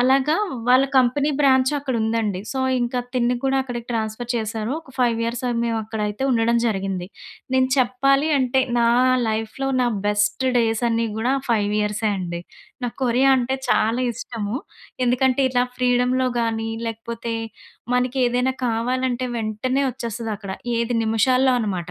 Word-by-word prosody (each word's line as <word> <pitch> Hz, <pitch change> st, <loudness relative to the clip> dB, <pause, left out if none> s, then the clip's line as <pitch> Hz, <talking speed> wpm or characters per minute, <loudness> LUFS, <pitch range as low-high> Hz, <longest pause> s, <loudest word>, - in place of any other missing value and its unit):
అలాగా 265 Hz, +4 st, +3 dB, 0.3 s
వాళ్ళ 255 Hz, +2 st, +6 dB
company 260 Hz, +3 st, +3 dB
branch 260 Hz, -2 st, +4 dB
అక్కడ 275 Hz, -2 st, -3 dB
ఉందండి. 220 Hz, -4 st, -1 dB
సో, 270 Hz, -, -3 dB, 0.2 s
ఇంకా 240 Hz, +1 st, -1 dB, 0.2 s
తిన్ని 245 Hz, 0 st, +2 dB
కూడా 270 Hz, 0 st, +2 dB
అక్కడికి 240 Hz, -2 st, -6 dB
ట్రాన్స్‌ఫర్ 225 Hz, +1 st, -3 dB
చేశారు. 220 Hz, 0 st, -2 dB
ఒక 320 Hz, -, -18 dB
5 240 Hz, -2 st, +2 dB
ఇయర్స్ 235 Hz, +1 st, -3 dB
అది 240 Hz, -1 st, -1 dB
మేము 230 Hz, -1 st, 0 dB
అక్కడైతే 210 Hz, +1 st, -3 dB
ఉండడం 235 Hz, -1 st, +2 dB
జరిగింది. 195 Hz, -4 st, -2 dB, 0.5 s
నేను 260 Hz, 0 st, +3 dB
చెప్పాలి 275 Hz, +3 st, +2 dB
అంటే 260 Hz, 0 st, +2 dB, 0.2 s
నా 235 Hz, -, +3 dB, 0.4 s
లైఫ్‌లో 220 Hz, +5 st, -2 dB
నా 250 Hz, -, +2 dB, 0.2 s
బెస్ట్ 210 Hz, +4 st, +1 dB
డేస్ 225 Hz, 0 st, +1 dB
అన్ని 230 Hz, 0 st, +1 dB
గూడా 235 Hz, +4 st, 0 dB
ఆ 265 Hz, -, -9 dB
5 210 Hz, -3 st, +1 dB
ఇయర్సే 210 Hz, +1 st, 0 dB
అండి. 170 Hz, -2 st, -4 dB, 0.4 s
నాకు 240 Hz, -, -4 dB
కొరియా 255 Hz, +3 st, +3 dB
అంటే 255 Hz, +1 st, 0 dB
చాలా 225 Hz, +3 st, +2 dB
ఇష్టము. 225 Hz, -1 st, -4 dB, 0.5 s
ఎందుకంటే 255 Hz, +2 st, +2 dB
ఇట్లా 245 Hz, -1 st, +2 dB
ఫ్రీడమ్‌లో 250 Hz, +1 st, +2 dB
గాని, 225 Hz, -1 st, -1 dB, 0.2 s
లేకపోతే 230 Hz, +1 st, -5 dB, 0.6 s
మనకి 250 Hz, +1 st, 0 dB
ఏదైనా 250 Hz, +2 st, 0 dB
కావాలంటే 250 Hz, +2 st, -1 dB
వెంటనే 230 Hz, +5 st, -1 dB
వచ్చేస్తది 230 Hz, -2 st, -5 dB
అక్కడ. 200 Hz, -2 st, -7 dB, 0.2 s
ఏది 235 Hz, +1 st, 0 dB
నిమిషాల్లో 255 Hz, +4 st, +3 dB
అన్నమాట. 185 Hz, -6 st, -3 dB
240 Hz, 150 wpm, -22 LUFS, 220-255 Hz, 0.6 s, వాళ్ళ